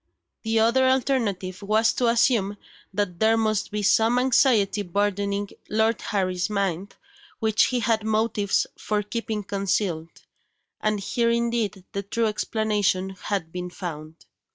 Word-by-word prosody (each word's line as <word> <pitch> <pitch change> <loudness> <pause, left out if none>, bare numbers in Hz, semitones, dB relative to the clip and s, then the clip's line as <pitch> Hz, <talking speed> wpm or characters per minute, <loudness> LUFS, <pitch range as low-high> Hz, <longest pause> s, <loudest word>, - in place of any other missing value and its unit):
The 225 0 0
other 240 +4 +4
alternative 225 -9 0
was 215 +2 +2
to 245 - +1
assume 230 -4 +2 0.3
that 195 -3 -2
there 220 +1 +4
must 215 -2 0
be 210 0 -3
some 225 +4 +4
anxiety 240 -5 +3
burdening 200 +1 -1 0.2
Lord 220 +1 +1
Harry's 185 -2 -1
mind, 195 -2 -2 0.4
which 220 -2 +3
he 250 -1 -1
had 225 -2 +1
motives 215 -2 +1
for 210 -1 -1
keeping 220 0 -4
concealed 190 -4 -2 0.6
and 215 -1 0
here 230 +4 0
indeed 235 -5 -1
the 200 - -3
true 225 +4 -1
explanation 210 -3 0
had 190 -3 -4
been 180 0 -5
found. 160 -3 -8
210 Hz, 130 wpm, -25 LUFS, 195-225 Hz, 0.6 s, other